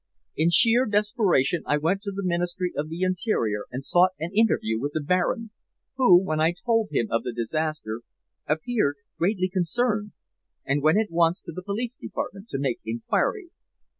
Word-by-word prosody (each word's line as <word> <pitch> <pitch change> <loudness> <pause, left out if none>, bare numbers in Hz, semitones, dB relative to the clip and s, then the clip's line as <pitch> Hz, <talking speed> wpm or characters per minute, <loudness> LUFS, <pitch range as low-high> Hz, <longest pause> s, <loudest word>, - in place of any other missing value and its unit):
"In 160 +2 +2
sheer 230 +9 +5
desperation 205 - +2
I 150 - +2
went 170 +6 0
to 200 -1 -4
the 200 0 -5
Ministry 175 +1 -1
of 150 +2 -3
the 170 +3 -3
Interior 180 - 0
and 130 +2 -6
sought 180 +1 +4
an 170 +4 -5
interview 200 - +2
with 145 +4 -3
the 155 - 0
Baron, 180 +8 0 0.4
who, 220 -10 +6
when 155 -5 -2
I 165 +2 +3
told 225 -3 +2
him 115 - 0
of 115 - +1
the 125 - -4
disaster, 120 -1 -3 0.5
appeared 155 - 0 0.2
greatly 185 +1 +1
concerned, 205 +4 -1 0.5
and 140 +1 0
went 155 +6 +4
at 215 -3 0
once 170 +1 +2
to - - -8
the 185 - -7
Police 225 +6 -3
Department 200 -3 -6
to 135 - -3
make 135 -3 -1
inquiry. 120 - -1
175 Hz, 170 wpm, -25 LUFS, 150-210 Hz, 0.5 s, who